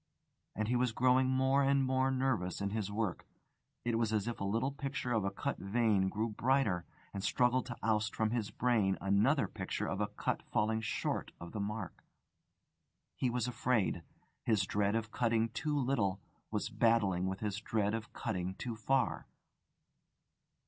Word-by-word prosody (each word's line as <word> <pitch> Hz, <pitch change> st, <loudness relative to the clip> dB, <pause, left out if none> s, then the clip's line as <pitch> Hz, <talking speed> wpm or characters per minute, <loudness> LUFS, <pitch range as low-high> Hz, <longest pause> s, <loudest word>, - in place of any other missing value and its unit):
And 110 Hz, +1 st, -1 dB
he 125 Hz, -, +1 dB
was 125 Hz, -2 st, +2 dB
growing 130 Hz, +2 st, +4 dB
more 130 Hz, +1 st, +3 dB
and 140 Hz, 0 st, +3 dB
more 130 Hz, 0 st, +2 dB
nervous 130 Hz, -9 st, 0 dB
in 100 Hz, 0 st, -1 dB
his 105 Hz, -2 st, -2 dB
work. 105 Hz, -3 st, -2 dB, 0.6 s
It 115 Hz, -1 st, +1 dB
was 115 Hz, -2 st, +1 dB
as 105 Hz, -1 st, 0 dB
if 120 Hz, -, -3 dB
a -, -, 0 dB
little 115 Hz, +7 st, 0 dB
picture 135 Hz, -2 st, -3 dB
of 110 Hz, -3 st, +2 dB
a 100 Hz, -, +1 dB
cut 140 Hz, +8 st, -3 dB
vein 100 Hz, -2 st, +2 dB
grew 110 Hz, +4 st, -1 dB
brighter, 110 Hz, -6 st, +1 dB, 0.3 s
and 100 Hz, -, -4 dB
struggled 125 Hz, +2 st, +2 dB
to 120 Hz, -, -6 dB
oust 110 Hz, -1 st, +1 dB
from 110 Hz, -1 st, +1 dB
his 115 Hz, -4 st, -1 dB
brain 110 Hz, -6 st, +2 dB
another 105 Hz, +6 st, +3 dB
picture -, -, -3 dB
of 95 Hz, -, -2 dB
a 105 Hz, -, +1 dB
cut 105 Hz, -, -2 dB
falling 110 Hz, +1 st, 0 dB
short 110 Hz, -, -2 dB
of 85 Hz, 0 st, -8 dB
the 110 Hz, -, -4 dB
mark. 105 Hz, +2 st, -4 dB, 1.1 s
He 130 Hz, -, 0 dB
was 120 Hz, 0 st, -1 dB
afraid: 120 Hz, -7 st, +1 dB, 0.4 s
his 110 Hz, -4 st, +2 dB
dread 100 Hz, +2 st, +1 dB
of 110 Hz, -1 st, -2 dB
cutting 115 Hz, -1 st, +1 dB
too 150 Hz, +5 st, -1 dB
little 115 Hz, -8 st, +1 dB, 0.3 s
was -, -, -2 dB
battling 100 Hz, -6 st, +2 dB
with 95 Hz, 0 st, -3 dB
his 105 Hz, -2 st, -2 dB
dread 105 Hz, -2 st, 0 dB
of 115 Hz, 0 st, -4 dB
cutting 95 Hz, -5 st, -3 dB
too 120 Hz, +2 st, -4 dB
far. 130 Hz, +4 st, 0 dB
110 Hz, 170 wpm, -34 LUFS, 100-125 Hz, 1.1 s, growing